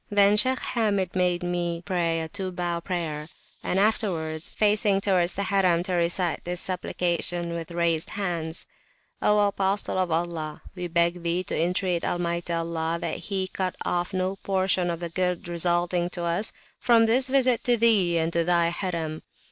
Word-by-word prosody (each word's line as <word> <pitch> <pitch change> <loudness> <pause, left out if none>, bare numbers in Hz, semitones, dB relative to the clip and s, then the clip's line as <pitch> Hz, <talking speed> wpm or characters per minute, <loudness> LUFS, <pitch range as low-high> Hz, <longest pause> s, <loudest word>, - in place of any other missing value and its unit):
Then 205 0 +4
Shaykh 255 +5 +5 0.2
Hamid 200 -6 0
made 180 -1 +1
me 175 -1 -2
pray 165 -2 0
a 160 - -4
two 190 +3 -4
bow 175 -1 -2
prayer, 165 -4 -4 0.3
and 185 - -1
afterwards, 170 -7 0
facing 205 -1 +2
towards 185 -3 +2
the 200 - -2
Harim, 185 -3 +2
to 185 - -2
recite 175 0 0
this 175 0 -2
supplication 175 -1 -1
with 165 -1 -5
raised 170 -2 0
hands: 170 -5 -2 0.6
O 210 - +3
Apostle 195 -1 0
of 185 -1 0
Allah, 160 -2 -3
we 180 -2 -5
beg 170 +1 +1
Thee 170 +2 0
to - - -4
entreat 180 +1 0
Almighty 170 0 -2
Allah, 165 0 -1
that 165 - -3
He 190 -2 -2
cut 185 -1 -3
off 175 +1 -1
no 185 0 -2
Portion 190 -2 0
of 170 0 -4
the 170 - -3
Good 180 0 -2
resulting 175 +1 0
to 175 - -4
us, 170 +5 +1 0.3
from 230 -2 +4
this 255 +4 +4
Visit 255 -3 +2
to 245 -1 +3
Thee 205 -7 +4
and 165 +1 0
to 170 - +2
Thy 170 0 +2
Harim! 170 -3 -3
175 Hz, 170 wpm, -25 LUFS, 170-195 Hz, 0.6 s, Shaykh